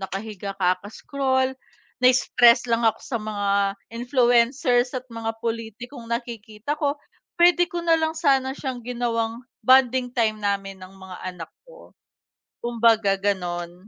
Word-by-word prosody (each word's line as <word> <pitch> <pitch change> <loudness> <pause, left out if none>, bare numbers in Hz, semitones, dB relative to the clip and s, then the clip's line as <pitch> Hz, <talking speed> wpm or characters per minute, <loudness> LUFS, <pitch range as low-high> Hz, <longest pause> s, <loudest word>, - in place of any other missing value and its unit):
nakahiga 195 0 -6
ka 180 -1 +2
kaka-scroll 260 +5 -1 0.5
na-stress 250 -1 +5
lang 230 0 +2
ako 220 0 +1
sa 245 - -3
mga 210 -1 -3 0.4
influencers 245 +1 +2
at 255 - -3
mga 225 -1 -4
pulitikong 230 +2 -5
nakikita 235 +3 -5
ko, 285 -2 0 0.4
pwede 350 0 +4
ko 345 -1 -4
nalang 325 -1 +2
sana 270 -5 +1
siyang 260 -3 -5
ginawang 235 -1 -2 0.2
bonding 255 -1 +4
time 220 -3 +1
namin 195 -2 -2
ng 185 +1 -12
mga 190 -1 -11 0.2
anak 165 -2 -9 0.2
ko, - - -16 0.7
kumbaga 225 -4 +2
ganon. 180 -2 -3
235 Hz, 125 wpm, -23 LUFS, 205-260 Hz, 0.7 s, na-stress